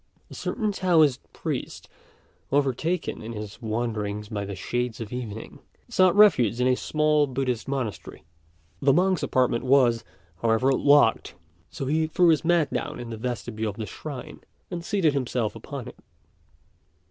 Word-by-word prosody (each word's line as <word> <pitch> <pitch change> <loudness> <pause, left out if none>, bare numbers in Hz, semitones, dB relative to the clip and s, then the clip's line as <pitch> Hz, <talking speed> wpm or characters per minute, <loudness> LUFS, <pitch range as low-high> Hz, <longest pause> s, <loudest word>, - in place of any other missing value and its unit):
A - - -8
certain 215 -4 -2
Taoist 165 -9 +3
priest, - - -5 0.6
overtaken 145 +5 0
in 115 +2 -6
his 105 +1 -8
wanderings 110 -2 -3
by 105 -3 -3
the 100 0 -6
shades 120 +4 -3
of 115 0 -6
evening, 110 -3 -6 0.3
sought 185 -1 +4
refuge 125 - +5
in 125 - +2
a 130 0 +4
small 150 +1 +2
Buddhist 130 -2 -2
monastery. 130 -6 -4 0.6
The 140 - +4
monk's 185 +2 +2
apartment 125 -2 +1
was, 125 -3 +4 0.4
however, 115 +4 +3
locked; 140 -3 +3 0.3
so 145 -5 -5
he 155 +3 +1
threw 175 +2 +3
his 160 -2 +3
mat 165 -3 +2
down 150 0 -3
in 120 -1 -7
the - - -4
vestibule 115 -2 -3
of 100 - -8
the 110 - -4
shrine, 135 +6 -8 0.3
and 170 -2 -4
seated 180 -6 +1
himself 125 -5 -1
upon - - -7
it. - - -11
130 Hz, 150 wpm, -25 LUFS, 115-155 Hz, 0.6 s, refuge